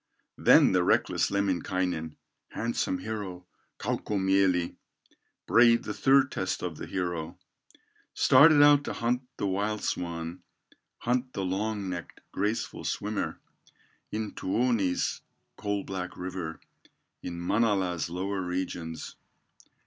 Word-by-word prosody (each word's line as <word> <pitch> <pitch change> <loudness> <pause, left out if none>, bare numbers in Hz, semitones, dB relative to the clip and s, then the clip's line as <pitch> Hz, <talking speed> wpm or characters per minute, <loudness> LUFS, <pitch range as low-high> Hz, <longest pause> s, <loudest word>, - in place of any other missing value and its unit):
Then - - +6
the 90 -1 +3
reckless - - +2
Lemminkainen, 95 -4 -1 0.4
Handsome 115 -5 -1
hero, 95 -3 -6 0.3
Kaukomieli, 95 -3 +1 0.7
Braved 115 0 +5
the 105 - -4
third 135 +5 +4
test 95 0 -2
of 85 -4 -4
the - - -7
hero, 85 -2 -3 0.8
Started 145 +2 +7
out 145 -1 +6
to - - -3
hunt 120 +2 0 0.2
the - - -2
wild 105 +2 -1
swan, 85 0 -3 0.6
Hunt 125 +2 -1
the 95 - -2
long 100 +2 -2
necked, 85 -2 -6
graceful 105 +4 -2
swimmer, - - -2 0.7
In 110 -1 -3
Tuoni's 105 -3 0 0.3
coal 100 -1 -2
black 90 -2 -5
river, 90 -3 -5 0.6
In 85 -1 -6
Manala's 95 -3 +1
lower 95 +3 -2
regions. 90 -2 -4
95 Hz, 110 wpm, -28 LUFS, 90-110 Hz, 0.8 s, Started